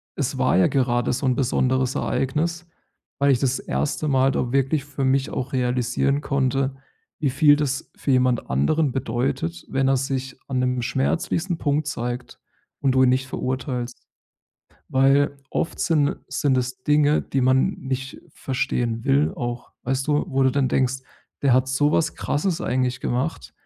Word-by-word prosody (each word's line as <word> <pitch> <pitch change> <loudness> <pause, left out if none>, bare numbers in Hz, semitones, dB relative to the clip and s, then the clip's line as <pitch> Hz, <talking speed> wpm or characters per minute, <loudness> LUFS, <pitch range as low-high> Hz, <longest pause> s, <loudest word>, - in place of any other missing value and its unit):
es - - -2
war - - +2
ja 95 - +5
gerade 120 -3 +1
so 130 - -2
'n 130 -1 +2
besonderes 130 0 +1
Ereignis, 165 +6 -1 0.5
weil 140 0 +4
ich 125 - +1
das 135 0 0
erste 150 +1 -2
Mal 135 -1 +3
da 125 -1 -2
wirklich 135 +1 +1
für 140 -1 -4
mich 135 0 +1
auch 130 - -4
realisieren 125 +2 0
konnte, 135 -1 0 0.4
wie 145 - +1
viel 145 +2 +5
das 145 0 -2
für 140 - -1
jemand 125 -2 +2
anderen 130 - +1
bedeutet, 120 - -2
wenn 135 0 +1
er 135 - +3
sich 135 0 -3
an 130 -2 -1
'nem 125 -1 0
schmerzlichsten 165 - -1
Punkt 150 -1 0
zeigt 120 -2 -4 0.4
und 135 - +3
du 130 - +5
ihn 130 - +5
nicht 130 +1 +1
verurteilst. 125 -1 -3 0.9
Weil, 135 +2 +3
oft 165 - -2
sind 150 -4 +2
sind 135 -3 +1
es 125 0 -3
Dinge, 150 0 +3
die 135 - -2
man 130 +1 +3
nicht 135 0 -5
verstehen 120 -4 -2
will 140 +2 +2
auch. 120 -1 -5
Weißt 135 +2 -1
du, 150 0 +1
wo 135 -3 +1
du 130 - +4
dann 140 -1 +1
denkst, 130 0 +1 0.4
der 140 -2 +4
hat 130 +1 +3
so 145 +3 +2
was 160 -1 +1
Krasses 165 +4 -1
eigentlich 125 0 -1
gemacht. 125 - -2
135 Hz, 165 wpm, -23 LUFS, 125-140 Hz, 0.9 s, ja